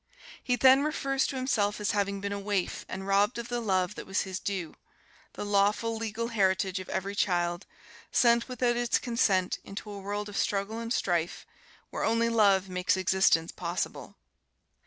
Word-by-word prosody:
He 250 - +1
then 260 +3 +6
refers 275 -3 0
to 275 - -4
himself 235 -6 0
as 205 -2 0
having 200 -1 -1
been 200 0 -3
a 200 - -3
waif 200 -2 -2
and 190 +1 -5
robbed 200 +4 +2
of 235 0 -5
the 240 -1 -1
love 190 -3 0
that - - -9
was 195 +1 0
his 190 0 -5
due, 185 -5 -4 0.6
"the - - -5
lawful, 205 +3 +2
legal 225 +1 -3
heritage 190 -3 +1
of 185 - -9
every 195 +2 -2
child, 175 -3 0 0.4
sent 235 0 +3
without 245 -1 0
its 240 -1 +2
consent 200 -7 +1
into 205 +1 -8
a 200 - -7
world 205 +1 -4
of 205 - -6
struggle 205 +3 -1
and 230 0 -5
strife, 175 -7 -1 0.5
where - - -3
only 230 +1 +2
love 200 -4 +3
makes 180 0 0
existence 185 -3 +3
possible." - - -4
205 Hz, 175 wpm, -29 LUFS, 190-230 Hz, 0.6 s, then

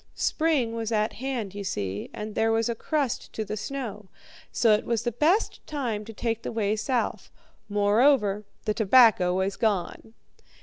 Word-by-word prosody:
Spring 300 -8 +1
was 230 -1 -3
at 215 -1 +1
hand, 245 -6 -4
you 200 0 -5
see, 100 - -3
and 210 0 -6
there 225 +1 +2
was 225 0 +1
a 235 - 0
crust 275 +2 -2
to 220 - -3
the 215 - -4
snow; 215 -4 -6 0.4
so 230 - +3
it 210 - +1
was 235 -1 -1
the 240 - -1
best 320 - +1
time 245 -8 -3
to 220 - -9
take 230 +1 -2
the - - -5
way 215 -2 0
south. 245 +2 -2 0.4
Moreover, 210 +1 +3 0.2
the 215 - +1
tobacco 210 -5 +5
was 190 +1 0
gone. 220 +1 -2
220 Hz, 170 wpm, -26 LUFS, 210-240 Hz, 0.4 s, tobacco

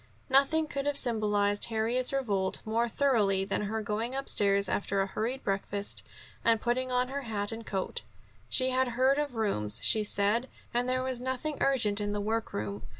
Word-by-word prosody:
Nothing 280 +4 +4
could 280 -2 -3
have 290 -1 +1
symbolized 210 -5 +2
Harriet's 235 +3 0
revolt 205 -9 -1
more 230 +2 0
thoroughly 210 -8 +2
than 200 - -1
her 215 +1 -3
going 220 +5 -3
upstairs 200 -7 +2
after 200 0 -1
a 195 - +2
hurried 225 +7 -3
breakfast, 200 0 -1 0.4
and 230 -1 +4
putting 255 +2 -1
on 250 0 +1
her 280 +1 -3
hat 210 -4 -3
and 225 0 -6
coat. 195 -3 -3 0.5
She 260 -1 +4
had 260 0 +2
heard 265 +3 +3
of 290 -4 -3
rooms, 110 - 0
she 215 - +4
said, 210 +5 +2 0.2
and 245 +1 0
there 255 0 0
was 255 -2 -1
nothing 260 +4 -2
urgent 220 -7 +2
in 205 0 -2
the 205 - -2
work 220 +2 -2
room. 100 0 -4
225 Hz, 180 wpm, -29 LUFS, 205-255 Hz, 0.5 s, Nothing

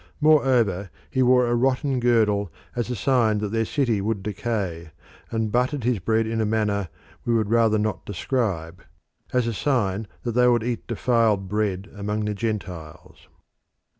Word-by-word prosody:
Moreover 125 - +3 0.2
he 130 - +1
wore 125 0 +5
a 120 - 0
rotten 130 +2 +1
girdle 105 -6 +2 0.2
as 120 0 -2
a 125 - -2
sign 115 -2 +2
that 105 0 -2
their 115 +1 0
city 120 -6 0
would 105 -1 -2
decay, 95 -6 -3 0.4
and 110 -2 -1
buttered 125 +3 0
his 120 -3 +1
bread 110 +5 +1
in 115 0 -1
a - - +2
manner 105 -4 0 0.3
we 120 - +1
would 110 -2 0
rather 115 -2 +4
not 105 -1 -2
describe, 95 -5 -2 0.5
as 125 -2 +1
a 115 - -1
sign 110 -5 0 0.2
that 120 - -1
they 125 +2 +4
would 120 -2 +3
eat 120 0 -3
defiled 115 -4 +1
bread 100 -1 -1
among 105 +1 -2
the 105 - -1
Gentiles. 95 -8 -6
110 Hz, 165 wpm, -24 LUFS, 100-120 Hz, 0.5 s, wore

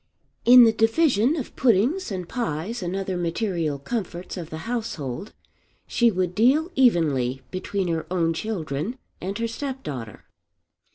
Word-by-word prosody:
In 245 +1 +10
the 225 - +6
division 235 +3 +3
of 280 -7 -5
puddings 250 - +2
and 180 -3 -4
pies 220 - -3
and 180 +1 -3
other 195 -1 -2
material 170 -3 -1
comforts 180 - -5
of 170 -4 -6
the 160 0 -7
household 215 - -4 0.5
she 235 -1 +3
would 185 -3 -1
deal 275 - +3
evenly 145 - +2
between 185 +1 -2
her 165 -1 -2
own 170 -2 +1
children 170 - -3 0.2
and 195 +3 -3
her 230 0 -1
step 265 +3 -5
daughter. 115 -7 -7
195 Hz, 145 wpm, -24 LUFS, 165-235 Hz, 0.5 s, In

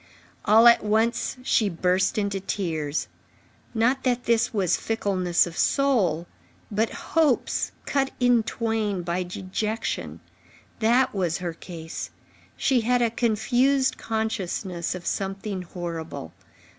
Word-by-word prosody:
All 220 +2 +6
at 235 - +6
once, 220 +4 +1
she 220 -4 +2
burst 185 +4 +1
into 200 -2 0
tears. 160 -6 -2 0.7
Not 250 +4 +2
that 245 -1 0
this 230 -1 +2
was 190 -5 +2
fickleness 185 -6 +1
of 170 -2 -8
soul; 205 - +2 0.5
but 220 +2 +1
hopes 315 -6 0
cut 270 -1 +1
in 245 -2 +4
twain 220 -4 -2
by 170 +1 -1
dejection—that 220 +5 -2
was 180 -4 0
her 175 -2 -4
case. 165 -1 -7 0.5
She 260 -4 +2
had 245 +2 +2
a 230 - +1
confused 250 +4 +2
consciousness 195 -6 -2
of 180 - -8
something 195 0 -3
horrible. 165 - -6
210 Hz, 115 wpm, -25 LUFS, 180-235 Hz, 0.7 s, All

